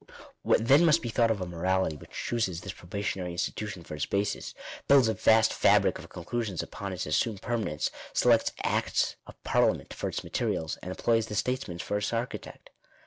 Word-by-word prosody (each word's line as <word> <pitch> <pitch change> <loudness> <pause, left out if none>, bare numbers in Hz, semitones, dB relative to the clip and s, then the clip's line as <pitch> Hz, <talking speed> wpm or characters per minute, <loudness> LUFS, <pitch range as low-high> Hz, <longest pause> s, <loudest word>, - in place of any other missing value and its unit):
What 115 - +2
then 140 +6 +7
must 165 -1 +4
be 120 - -2
thought 115 +1 +3
of 110 -4 0
a - - -1
morality 90 -1 0
which 75 - -13
chooses 100 -8 -2
this 95 +1 -6
probationary 90 -1 -4
institution 100 +1 -3
for - - -9
its 75 - -2
basis, 100 0 -2 0.3
builds 135 -4 +6
a 110 - +2
vast 110 +2 +4
fabric - - +4
of - - -11
conclusions 100 0 -3
upon 100 -1 -6
its 90 - -3
assumed 100 +7 0
permanence, 110 -11 -1 0.2
selects 115 -2 +3
acts - - +1
of - - -11
par - - +2
liament - - +1
for - - -3
its - - -4
materials, 80 -1 -2
and 90 - -7
employs 115 +4 +1
the 105 - -5
statesman 125 -6 -1
for 105 +4 -2
its 105 - -2
architect? 115 +2 -5
105 Hz, 190 wpm, -29 LUFS, 90-115 Hz, 0.3 s, then